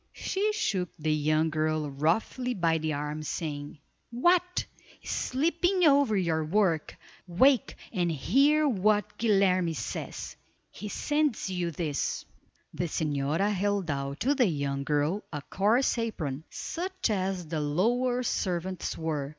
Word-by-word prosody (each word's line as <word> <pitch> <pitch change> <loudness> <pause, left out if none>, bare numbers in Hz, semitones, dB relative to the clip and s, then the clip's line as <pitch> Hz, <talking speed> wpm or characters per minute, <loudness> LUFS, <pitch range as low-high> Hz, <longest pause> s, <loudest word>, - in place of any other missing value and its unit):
She 415 +2 -1
shook 195 - -1
the 155 0 0
young 155 +1 +1
girl 155 -1 0
roughly 220 - 0
by 165 -4 +2
the 155 0 -1
arm, 150 +1 -3
saying, 145 -1 -4 0.3
"What, 350 +9 +2 0.4
sleeping 340 +7 0
over 280 -8 +5
your 165 -4 +1
work. 170 -2 +1 0.3
Wake, 245 +8 +3 0.2
and 175 -2 +1
hear 280 - +3
what 210 -2 +1
Guilerme 190 -6 +3
says. - - -5 0.4
He 210 - -7
sends 295 -6 0
you 180 -2 -1
this!" 155 -3 -2 0.5
The 175 - -2
señora 155 +5 0
held 200 -3 0
out 140 +2 -4
to 265 +6 +3
the 260 -5 +3
young 140 -4 -2
girl 150 +8 0
a 150 -3 -5
coarse 215 - +2
apron, 160 -11 -3
such 370 -5 -3
as 190 -3 -1
the 155 0 -3
lower 240 +12 +1
servants 185 -4 -2
wore. 150 -4 -2
185 Hz, 130 wpm, -28 LUFS, 155-240 Hz, 0.5 s, over